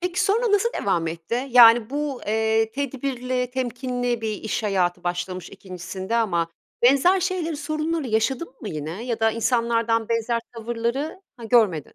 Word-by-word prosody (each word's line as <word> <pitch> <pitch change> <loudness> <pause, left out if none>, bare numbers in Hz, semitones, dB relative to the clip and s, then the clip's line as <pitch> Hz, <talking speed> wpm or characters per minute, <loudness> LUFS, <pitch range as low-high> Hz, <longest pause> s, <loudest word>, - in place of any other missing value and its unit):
Peki, 360 0 0
sonra 440 +2 +2
nasıl 410 +3 +3
devam 175 -5 +1
etti? 170 +11 -3
Yani, 235 -2 +7
bu, 285 -2 -3
eee, 220 +1 +1
tedbirli, 255 -1 -3
temkinli 245 -1 -2
bir 220 -1 -2
iş 220 +2 -3
hayatı 185 -5 0
başlamış 180 0 -3
2'ncisinde 190 +2 -5
ama 175 -8 +1 0.3
benzer 280 +10 +5
şeyleri, 355 -4 -1
sorunları 310 0 -2
yaşadın 240 +7 -1
mı 215 - -6
yine 160 +7 -5
ya 235 -2 -3
da 225 0 +4
insanlardan 230 -1 +1
benzer 230 0 0 0.2
tavırları, 235 +8 -3 0.2
ha, 235 - -10
görmedin. 215 - +2
235 Hz, 145 wpm, -23 LUFS, 215-270 Hz, 0.3 s, Yani